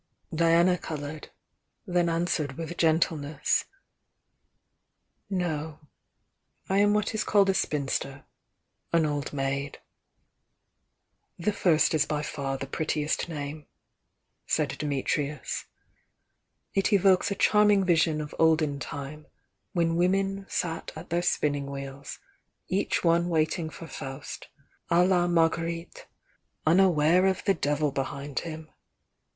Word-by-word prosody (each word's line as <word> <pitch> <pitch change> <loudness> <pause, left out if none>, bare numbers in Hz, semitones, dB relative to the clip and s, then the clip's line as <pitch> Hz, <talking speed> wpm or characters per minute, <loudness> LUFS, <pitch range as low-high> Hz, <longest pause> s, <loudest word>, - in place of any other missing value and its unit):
Diana 170 +2 +4
coloured 150 0 -6 0.3
— - - -52
then 175 -1 +3
answered 165 -4 0
with 165 +1 -5
gentleness: 155 -3 +1 1.6
"No. 160 -5 -2 0.9
I 195 +1 +2
am 205 0 +4
what 210 +1 0
is 220 - 0
called 200 -2 +4
a - - -2
spinster, 140 -4 -2 0.3
— - - -50
an 165 -1 +4
old 145 -2 -2
maid." 140 0 -2 1.6
"The 190 +5 0
first 165 -6 +3
is 155 -1 +2
by 150 -1 -1
far 140 -3 -3
the 135 - -5
prettiest 155 +3 -1
name," 150 -1 -6 0.8
said - - +1
Di 150 - -4
mitrius. 145 0 -2 1.1
"It 195 +2 +1
evokes 195 -2 +4
a 200 - -2
charming 210 -1 +4
vision 160 -3 +2
of 150 - -7
olden 155 -3 +3
time 145 +2 -7 0.5
when 165 -2 +1
women 195 +2 +1
sat 165 -2 -3
at 160 +2 -10
their 170 +1 +2
spinning 145 -5 0
wheels, 140 0 -7 0.5
each 190 +2 0
one 170 0 +3
waiting 160 0 0
for 165 - -10
Faust, 135 -3 -7 0.4
d 170 - +2
la 180 0 +4
Marguerite, 165 0 0 0.6
unaware 175 +1 +4
of 190 -1 0
the 195 - +3
Devil 145 -2 0
behind 140 +1 -3
him! 160 -2 -8
160 Hz, 120 wpm, -27 LUFS, 145-175 Hz, 1.6 s, Diana